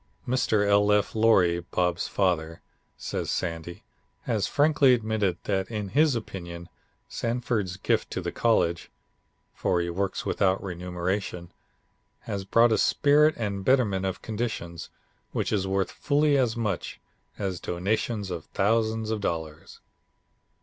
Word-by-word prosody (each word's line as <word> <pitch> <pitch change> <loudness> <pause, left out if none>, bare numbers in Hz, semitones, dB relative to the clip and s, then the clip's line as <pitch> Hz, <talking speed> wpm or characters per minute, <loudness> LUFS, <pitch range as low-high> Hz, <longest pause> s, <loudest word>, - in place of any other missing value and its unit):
"Mr. 110 -5 +2
L. 100 0 +4
F. 105 -1 +2
Loree, 95 -6 +4
Bob's 90 -1 0
father," 85 -4 -1 0.3
says - - -4
Sandy, 85 0 -4 0.4
"has - - 0
frankly 145 -3 +4
admitted 110 -5 -1
that 95 -2 -1
in 105 -3 -4
his 145 +3 +3
opinion 85 -6 -6 0.4
Sanford's 115 -6 -2
gift - - 0
to - - -3
the - - -3
college 85 +1 +1 0.6
(for 90 - 0
he 85 0 -2
works 95 +3 -2
without 95 -1 +1
remuneration) 90 0 -4 0.7
has 100 -1 -5
brought 115 +4 +4
a 110 - +2
spirit 150 +2 +4
and 105 -3 -2
a - - -7
betterment 100 -7 +2
of 95 - -5
conditions 105 -7 -4 0.4
which - - -1
is 95 -2 0
worth 95 0 0
fully 145 0 +2
as 125 -4 +1
much 105 -6 -3 0.4
as 95 -3 -3
donations 100 +3 -2
of 85 -3 -5
thousands 110 +1 0
of 110 -2 -2
dollars. 80 -4 -5
100 Hz, 135 wpm, -26 LUFS, 90-115 Hz, 0.7 s, L